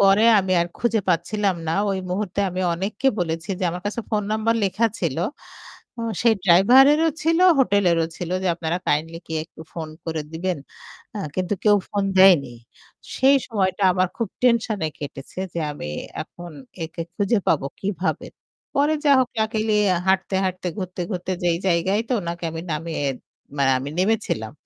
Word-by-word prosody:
পরে 195 Hz, +1 st, +5 dB, 0.2 s
আমি 190 Hz, -1 st, 0 dB
আর 170 Hz, -, +1 dB
খুঁজে 230 Hz, -2 st, +1 dB
পাচ্ছিলাম 190 Hz, +3 st, +1 dB
না -, -, +1 dB, 0.2 s
ওই 195 Hz, -, -1 dB
মুহূর্তে 200 Hz, +1 st, -2 dB
আমি 180 Hz, +1 st, -3 dB
অনেককে 195 Hz, +8 st, -1 dB
বলেছি 165 Hz, -2 st, -2 dB
যে 185 Hz, -, 0 dB
আমার 180 Hz, +1 st, -6 dB
কাছে 210 Hz, +3 st, -2 dB
ফোন 210 Hz, -2 st, +1 dB
নাম্বার 220 Hz, +1 st, +1 dB
লেখা 215 Hz, +4 st, +2 dB
ছিল। 160 Hz, -7 st, -1 dB, 1.1 s
সেই 230 Hz, -1 st, +5 dB
ড্রাইভারেরও 265 Hz, -, +6 dB
ছিল, 330 Hz, +2 st, +2 dB, 0.2 s
হোটেলেরও 185 Hz, -9 st, +3 dB
ছিল 175 Hz, -, -5 dB
যে, -, -, +1 dB
"আপনারা 165 Hz, 0 st, -2 dB
কাইন্ডলি 165 Hz, +3 st, 0 dB
কেউ 160 Hz, -, -3 dB
একটু 160 Hz, -, -14 dB
ফোন 160 Hz, -2 st, -5 dB, 0.2 s
করে 160 Hz, -2 st, -2 dB
দিবেন?" 175 Hz, +1 st, -2 dB, 0.8 s
কিন্তু 185 Hz, +2 st, -1 dB
কেউ 210 Hz, -1 st, +6 dB
ফোন 200 Hz, -1 st, -1 dB
দেয়নি। 180 Hz, -9 st, +6 dB, 0.6 s
সেই 270 Hz, +2 st, +5 dB
সময়টা 195 Hz, -4 st, 0 dB
আমার 185 Hz, 0 st, +2 dB
খুব 230 Hz, -, -1 dB
টেনশনে 225 Hz, -7 st, +2 dB
কেটেছে 140 Hz, +3 st, -8 dB
যে, 170 Hz, -, -2 dB
আমি 145 Hz, -, -7 dB, 0.4 s
এখন 175 Hz, 0 st, -10 dB, 0.3 s
একে 160 Hz, +1 st, -6 dB
খুঁজে 205 Hz, +3 st, +1 dB
পাবো 145 Hz, -4 st, +2 dB
কিভাবে। 190 Hz, -1 st, -2 dB, 0.5 s
পরে 290 Hz, +2 st, +3 dB
যা 285 Hz, -, +5 dB
হোক 255 Hz, -1 st, +1 dB
লাকিলি 220 Hz, 0 st, 0 dB, 0.4 s
হাঁটতে, 190 Hz, 0 st, +1 dB
হাঁটতে 185 Hz, 0 st, -3 dB
ঘুরতে, 185 Hz, -1 st, -4 dB
ঘুরতে 180 Hz, 0 st, -3 dB
যেই 170 Hz, -1 st, +2 dB
জায়গায় 185 Hz, +4 st, +2 dB
তো -, -, +1 dB
ওনাকে 170 Hz, 0 st, -5 dB
আমি 165 Hz, 0 st, -5 dB
নামিয়ে 160 Hz, 0 st, -3 dB, 0.6 s
মানে 135 Hz, -1 st, +3 dB
আমি 135 Hz, +2 st, -5 dB
নেমেছিলাম। 190 Hz, -, 0 dB
185 Hz, 160 wpm, -23 LUFS, 170-215 Hz, 1.1 s, ড্রাইভারেরও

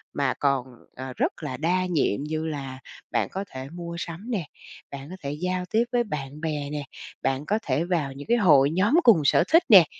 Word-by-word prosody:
mà 140 Hz, -3 st, +1 dB
còn, 140 Hz, -3 st, +1 dB, 0.3 s
à, 130 Hz, 0 st, -6 dB
rất -, -, -1 dB
là 130 Hz, -3 st, -4 dB
đa 180 Hz, +4 st, +1 dB
nhiệm 150 Hz, -, 0 dB
như 155 Hz, +1 st, -3 dB
là 135 Hz, -4 st, -5 dB, 0.3 s
bạn -, -, 0 dB
có 195 Hz, +1 st, -4 dB
thể 130 Hz, +1 st, -7 dB
mua 170 Hz, +1 st, -7 dB
sắm 180 Hz, +9 st, -6 dB
nè, 190 Hz, -8 st, -1 dB, 0.5 s
bạn 140 Hz, 0 st, -7 dB
có 185 Hz, -, -7 dB
thể 140 Hz, -, -3 dB
giao 180 Hz, +4 st, -2 dB
tiếp 225 Hz, +2 st, +4 dB
với 240 Hz, -1 st, +2 dB
bạn 150 Hz, -6 st, -6 dB
bè 150 Hz, -3 st, -2 dB
nè, 150 Hz, -1 st, -3 dB, 0.4 s
bạn 135 Hz, +2 st, -1 dB
có 210 Hz, +6 st, +1 dB
thể 140 Hz, +3 st, 0 dB
vào 165 Hz, -7 st, -1 dB
những 140 Hz, +1 st, -10 dB
cái 240 Hz, -, +3 dB
hội 145 Hz, -9 st, +5 dB
nhóm 195 Hz, -, +2 dB
cùng 215 Hz, -10 st, +6 dB
sở 140 Hz, -, +5 dB
thích 330 Hz, +2 st, +6 dB
nè. 190 Hz, -7 st, +10 dB
155 Hz, 215 wpm, -25 LUFS, 140-185 Hz, 0.5 s, nè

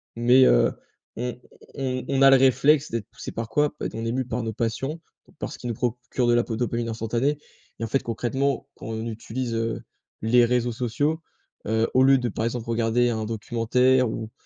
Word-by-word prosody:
mais, 125 Hz, +3 st, +5 dB
heu, -, -, +4 dB, 0.4 s
on 125 Hz, +1 st, -4 dB, 0.4 s
on 130 Hz, -2 st, -2 dB
on 135 Hz, -1 st, 0 dB
a 135 Hz, -, +9 dB
le 135 Hz, -, +8 dB
réflexe 140 Hz, +3 st, +4 dB
d'être 115 Hz, -3 st, -3 dB
poussé -, -, -8 dB
par 115 Hz, -1 st, -5 dB
quoi? 150 Hz, +5 st, +1 dB
Bah, -, -, -4 dB
on 115 Hz, -, -4 dB
est 115 Hz, -, -1 dB
mûs 130 Hz, +1 st, -1 dB
par 125 Hz, 0 st, -2 dB
nos 110 Hz, -1 st, -3 dB
passions, 135 Hz, +8 st, -2 dB, 0.3 s
donc -, -, -24 dB
par -, -, -5 dB
ce -, -, -9 dB
qui 125 Hz, -, -6 dB
nous 120 Hz, -, -1 dB
procure 125 Hz, +2 st, -2 dB
de 120 Hz, -, +4 dB
la 120 Hz, 0 st, +3 dB
po 115 Hz, -, -4 dB
dopamine 120 Hz, -1 st, -1 dB
instantanée. 115 Hz, +6 st, -1 dB, 0.4 s
Et -, -, -3 dB
en 115 Hz, -, -1 dB
fait, 135 Hz, +5 st, 0 dB
concrètement, 130 Hz, +4 st, -1 dB
quand -, -, -10 dB
on 110 Hz, 0 st, -4 dB
utilise, 115 Hz, +2 st, -4 dB
heu, 115 Hz, 0 st, -2 dB, 0.4 s
les 120 Hz, +2 st, +5 dB
réseaux 120 Hz, 0 st, +1 dB
sociaux, 145 Hz, +7 st, -1 dB, 0.5 s
heu, 110 Hz, +1 st, +2 dB
au 130 Hz, -, +4 dB
lieu 135 Hz, 0 st, +6 dB
de, 125 Hz, -2 st, -1 dB
par 110 Hz, +2 st, -3 dB
exemple, 115 Hz, 0 st, -3 dB
regarder 115 Hz, +1 st, +2 dB
un 110 Hz, -2 st, -2 dB
documentaire 120 Hz, +3 st, +2 dB
ou 110 Hz, 0 st, -5 dB
120 Hz, 210 wpm, -25 LUFS, 115-130 Hz, 0.5 s, a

